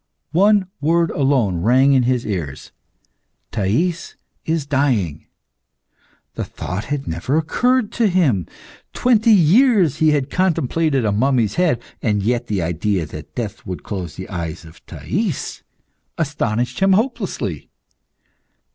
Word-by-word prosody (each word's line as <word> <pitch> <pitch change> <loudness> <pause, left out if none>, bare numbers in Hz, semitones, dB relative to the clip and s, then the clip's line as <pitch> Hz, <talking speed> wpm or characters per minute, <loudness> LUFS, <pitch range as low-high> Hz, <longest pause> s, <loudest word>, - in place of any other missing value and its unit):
One 200 +3 +4
word 165 +2 +2
alone 130 - +1
rang 130 +7 +4
in 130 - +4
his 125 -2 0
ears, 80 -10 -5 0.8
"Thais 160 - -1 0.3
is 160 -2 -1
dying!" 125 - 0 1.1
The - - -4
thought 95 +5 -5
had 145 -1 -4
never 85 - -1
occurred 245 +9 +1
to 230 - +1
him. 145 - +1 0.5
Twenty 235 -2 +3
years 200 - +4
had 150 -3 +3
he - - -11
contemplated 160 -6 +1
a 105 - +2
mummy's 115 -1 +1
head, 160 -10 +1 0.2
and 105 -3 0
yet 120 +3 0
the 100 -5 -1
idea 85 +2 -1
that 75 -1 -10
death 110 -5 -5
would 90 -1 -6
close 90 -5 -5
the 95 - -7
eyes 85 -3 -5
of 80 - -16
Thais - - -3 0.6
astonished 125 -7 -1
him 195 0 +4
hopelessly. 195 - -2
130 Hz, 130 wpm, -20 LUFS, 100-170 Hz, 1.1 s, One